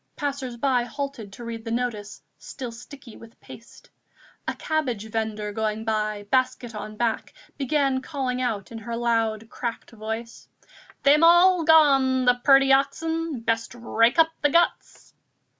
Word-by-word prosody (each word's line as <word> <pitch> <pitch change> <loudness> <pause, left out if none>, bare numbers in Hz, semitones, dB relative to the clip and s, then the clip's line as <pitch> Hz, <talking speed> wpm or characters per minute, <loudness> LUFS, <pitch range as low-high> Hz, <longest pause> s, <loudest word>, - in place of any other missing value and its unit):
Passers 275 -4 -4
by 255 0 +2
halted 260 -5 -6
to 240 - -10
read 230 -1 -6
the 225 - -6
notice, 225 -4 -4 0.2
still 250 -3 -7
sticky 245 +1 -12
with 230 0 -16
paste. - - -15 0.6
A - - -2
cabbage 255 -10 -2
vendor 215 -2 -3
going 220 +1 -3
by, 215 -1 -1
basket 255 -2 0
on 215 0 -7
back, 230 -1 -2 0.2
began 275 -1 0
calling 260 -3 -3
out 225 -6 -3
in 225 - -7
her 230 +1 -5
loud 225 -2 0
cracked 235 -2 -5
voice: 225 +1 -7 0.5
"They'm 295 +3 +5
all 345 +1 +6
gone, 270 -5 +5
the 245 0 +3
purty 270 -1 +6
oxen! 320 +1 -1
best 230 +1 -2
rake 235 +2 +1
up 325 0 +5
the 295 - +3
guts!" 340 +4 0
245 Hz, 145 wpm, -24 LUFS, 225-275 Hz, 0.6 s, all